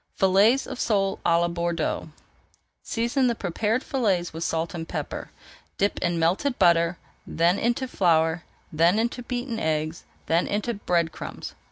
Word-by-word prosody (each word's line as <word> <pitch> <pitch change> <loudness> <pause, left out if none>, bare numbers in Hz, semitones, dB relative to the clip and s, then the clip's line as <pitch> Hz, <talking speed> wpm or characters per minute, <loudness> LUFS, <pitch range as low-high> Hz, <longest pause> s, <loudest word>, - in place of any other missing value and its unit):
FILLETS 200 +7 +4
OF - - -7
SOLE 195 -3 +1
À 170 0 +3
LA 170 - +2
BORDEAUX 170 -2 -2 0.7
Season 240 +3 0
the 235 - +1
prepared 215 +6 -1
fillets 195 - 0
with 165 +1 -4
salt 165 0 -1
and 165 -2 -5
pepper, - - -5 0.5
dip 200 +1 0
in 170 -1 0
melted 185 - +1
butter, 170 0 +3 0.3
then 170 +3 +2
into 240 +3 0
flour, 165 -6 +2 0.3
then 170 +5 +4
into 235 +2 -1
beaten 245 -1 -4
eggs, 155 +1 -2 0.2
then 165 +2 +1
into 215 +4 -1
bread 175 -5 0
crumbs. - - -7
180 Hz, 150 wpm, -25 LUFS, 165-230 Hz, 0.7 s, FILLETS